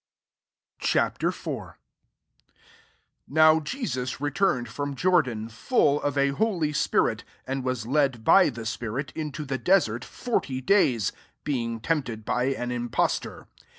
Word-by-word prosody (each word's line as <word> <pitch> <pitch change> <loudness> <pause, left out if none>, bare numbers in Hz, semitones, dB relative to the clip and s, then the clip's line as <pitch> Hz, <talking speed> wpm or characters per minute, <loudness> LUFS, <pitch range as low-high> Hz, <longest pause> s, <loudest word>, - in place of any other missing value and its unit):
» - - -61
Ch. - - 0
IV. - - 0
1 - - -5 1.5
NOW 155 0 +5
Jesus 150 - -4
re 145 +1 -1
turned 135 -8 +1
from 140 +5 -4
Jordan, 130 -12 +1
full 145 - +1
of 145 0 -1
a 140 0 +3
holjT 165 -4 0
spirit, - - +1 0.2
and 135 0 -3
was 130 -3 -2
led 135 -3 +1
by 190 +9 +6
the 120 - -7
I - - -6
spirit 120 +4 -4
into 155 -1 -4
the 135 -1 -3
desert 130 - +2
forty 140 - -2
days, 130 - +2 0.3
being 115 -5 -2
tempted 120 -7 -2
by 125 0 0
an 125 -2 -2
impost 120 -1 0
or. - - -12
135 Hz, 145 wpm, -26 LUFS, 120-155 Hz, 1.5 s, by